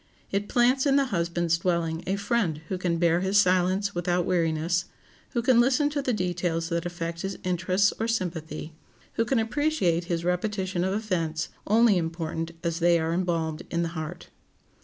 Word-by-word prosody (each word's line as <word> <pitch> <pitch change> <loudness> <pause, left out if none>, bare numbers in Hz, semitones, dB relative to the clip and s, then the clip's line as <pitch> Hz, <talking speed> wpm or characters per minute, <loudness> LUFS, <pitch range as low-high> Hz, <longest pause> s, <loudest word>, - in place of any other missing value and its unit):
It 200 +1 -1
plants 255 +3 +3
in 275 - +4
the 280 -1 +4
husband's 170 -1 0
dwelling 170 -2 -1
a 190 - +1
friend 200 -6 0
who 185 - -2
can 175 -2 0
bear 170 0 +3
his 190 +2 +1
silence 185 +1 +3
without 175 0 0
weariness; 170 0 +1 0.5
who 235 -2 0
can 250 -1 +5
listen 270 +4 +3
to 290 -1 -1
the 260 - 0
details 175 -4 -1
that 170 0 -1
affect 170 -1 -5
his 195 0 -4
interests 185 +3 +2
or 225 - 0
sympathy; 165 -7 -3 0.4
who 225 - +1
can 260 +3 +1
appreciate 225 - +1
his 170 -1 -2
repetition 185 0 -1
of 190 +1 0
events, 165 -7 -2 0.2
only 220 -2 +5
important 165 0 -3
as 170 0 -1
they 170 0 +4
are 160 +1 -1
embalmed 165 -3 -1
in 170 0 0
the 165 - -2
heart. 165 +1 -7
180 Hz, 175 wpm, -26 LUFS, 170-205 Hz, 0.5 s, can